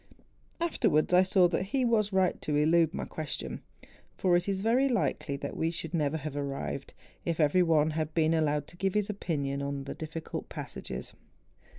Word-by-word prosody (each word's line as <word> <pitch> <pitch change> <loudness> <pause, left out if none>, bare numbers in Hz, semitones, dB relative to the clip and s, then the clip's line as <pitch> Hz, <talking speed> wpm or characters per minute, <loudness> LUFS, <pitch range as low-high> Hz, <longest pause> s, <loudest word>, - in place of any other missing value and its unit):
Afterwards 220 - +2
I 180 - +8
saw 185 -1 +4
that 170 - 0
he 250 +7 0
was 215 -3 +2
right 190 -1 +2
to 150 - -1
elude 160 +2 +4
my - - -4
question; 155 -3 -5 0.6
for 180 -2 +3
it 175 +3 +1
is 190 -1 -1
very 245 +6 +3
likely 175 - 0
that 140 0 -5
we 160 - 0
should 165 -1 -6
never 155 -2 +1
have 150 -1 -5
arrived, 140 -1 -4 0.3
if 170 -1 -2
every 155 +4 +4
one 160 -3 +3
had 155 0 -3
been 160 -1 +3
allowed 150 -2 +1
to 175 - -13
give 195 +1 -1
his 210 0 +1
opinion 140 -8 -2
on 140 0 -3
the 140 - -5
difficult 160 0 -6
passages. 65 -1 -6
165 Hz, 185 wpm, -30 LUFS, 150-190 Hz, 0.6 s, I